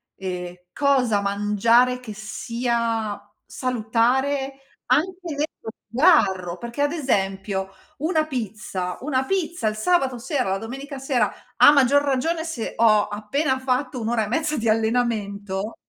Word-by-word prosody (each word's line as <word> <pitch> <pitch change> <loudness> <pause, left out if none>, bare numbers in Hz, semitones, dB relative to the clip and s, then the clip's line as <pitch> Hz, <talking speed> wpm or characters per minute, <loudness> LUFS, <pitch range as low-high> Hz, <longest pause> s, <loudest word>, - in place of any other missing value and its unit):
ehm, 180 -2 -5 0.2
cosa 255 -7 +2
mangiare, 210 +5 +2
che 235 -4 -8
sia 230 0 -2 0.3
salutare 255 +3 0 0.3
anche 365 +4 +1 0.2
nello 290 -6 -4 0.2
sgarro, 195 - +3
perché 235 +4 -5
ad 290 - +2
esempio 195 - -1 0.3
1 315 +1 +1
pizza 210 -9 -4
1 265 -2 0
pizza, 345 - -1
il 215 - 0
sabato 265 0 +1
sera, 260 - -1
la 195 - 0
domenica 270 +6 -7
sera, 260 -5 +1 0.3
a 290 - +9
maggior 285 0 +4
ragione, 305 +4 0
se 270 -9 -4
ho 215 -2 +4
appena 260 +7 -1
fatto 260 0 -1
1 220 - -2
ora 225 -2 +1
e - - -7
mezza 305 +7 0
di 225 -1 0
allenamento 215 -3 -1
240 Hz, 130 wpm, -23 LUFS, 210-275 Hz, 0.3 s, a